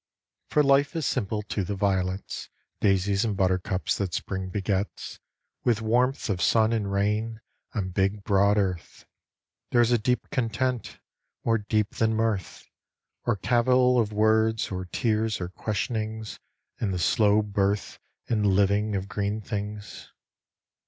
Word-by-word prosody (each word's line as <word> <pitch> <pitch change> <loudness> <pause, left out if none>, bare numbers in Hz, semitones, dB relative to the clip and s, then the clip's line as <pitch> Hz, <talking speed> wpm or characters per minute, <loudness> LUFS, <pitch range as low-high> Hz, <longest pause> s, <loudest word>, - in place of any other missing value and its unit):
For 150 - +3
life 140 +3 +3
is 160 -3 -1
simple 105 -4 -1
to 100 -1 -2
the 100 +3 -3
violets, 95 -1 -1 0.3
Daisies 100 0 +2
and 105 -4 -1
buttercups 95 0 0
that 95 -4 -2
Spring 95 -1 -3
begets 100 +1 -3 0.4
With 115 -3 +2
warmth 125 +4 +1
of 95 -5 -1
sun 110 0 +3
and 105 -3 -1
rain 105 +3 0 0.4
on 95 -4 -1
big, 95 +2 0
broad 100 +1 +3
Earth. 95 -4 -2 0.6
There 120 - +2
is 120 0 +4
a 120 - +4
deep 125 +3 0
content, 125 0 -1 0.5
more 115 -1 +3
deep 105 +1 0
than 110 0 +2
mirth. 110 -5 -2 0.6
Or 120 - +2
cavil 125 +4 +3
of 110 -2 +1
words, 110 +1 +2
or 95 -1 -3
tears, 110 +3 0
or 90 -1 -4
questionings 110 +2 -3 0.4
In 105 - 0
the 95 - -1
slow 105 +5 +3
birth 100 0 -1 0.3
and 110 -3 +1
living 100 +2 +2
of 95 0 -2
green 100 +2 -2
things. 105 0 -6
105 Hz, 140 wpm, -26 LUFS, 100-115 Hz, 0.6 s, is